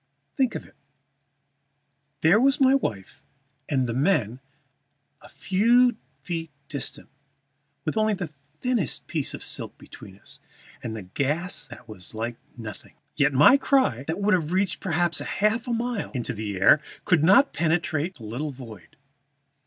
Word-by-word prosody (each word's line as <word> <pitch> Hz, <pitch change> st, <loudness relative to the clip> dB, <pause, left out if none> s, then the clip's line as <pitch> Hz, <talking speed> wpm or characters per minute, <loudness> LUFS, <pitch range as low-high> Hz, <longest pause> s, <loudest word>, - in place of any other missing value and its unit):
Think 260 Hz, -3 st, +1 dB
of -, -, -5 dB
it; -, -, -19 dB, 1.5 s
there 170 Hz, +7 st, +5 dB
were 275 Hz, +1 st, +5 dB
my 265 Hz, -1 st, +5 dB
wife 105 Hz, -, -2 dB, 0.5 s
and 130 Hz, -3 st, +1 dB
the 115 Hz, -, -2 dB
men 130 Hz, -, +1 dB, 0.8 s
a -, -, -14 dB
few 235 Hz, +5 st, +3 dB, 0.3 s
feet 165 Hz, -2 st, -4 dB, 0.2 s
distant, 140 Hz, -, -3 dB, 0.8 s
with 155 Hz, -, -1 dB
only 215 Hz, -1 st, +2 dB
the 180 Hz, -5 st, -5 dB, 0.3 s
thinnest 240 Hz, -, -1 dB
tissue -, -, -2 dB
of -, -, -10 dB
silk -, -, -4 dB
between 95 Hz, -1 st, -13 dB
us, -, -, -15 dB, 0.4 s
and 110 Hz, -1 st, -5 dB
a 105 Hz, -, -7 dB
gas 145 Hz, -, -2 dB
that 140 Hz, -, -12 dB
was 100 Hz, -2 st, -7 dB
like 115 Hz, +2 st, -3 dB, 0.2 s
nothing. 105 Hz, -4 st, -9 dB, 0.2 s
Yet 140 Hz, +1 st, +3 dB
my 150 Hz, -, +7 dB
cry, 265 Hz, -, +2 dB
that 160 Hz, +4 st, -2 dB
would 205 Hz, +1 st, +2 dB
have 165 Hz, -3 st, +1 dB
reached 190 Hz, 0 st, +1 dB
perhaps 175 Hz, -2 st, +1 dB
half 220 Hz, +5 st, 0 dB
a -, -, -2 dB
mile 235 Hz, -2 st, -2 dB
in 120 Hz, -, -2 dB, 0.3 s
air, 100 Hz, +10 st, +6 dB, 0.2 s
could 165 Hz, -4 st, +3 dB
not 225 Hz, -, +5 dB
penetrate 165 Hz, 0 st, 0 dB
that 120 Hz, -, -13 dB
little 120 Hz, +8 st, -4 dB
void. 115 Hz, -, -11 dB
160 Hz, 150 wpm, -25 LUFS, -, 1.5 s, my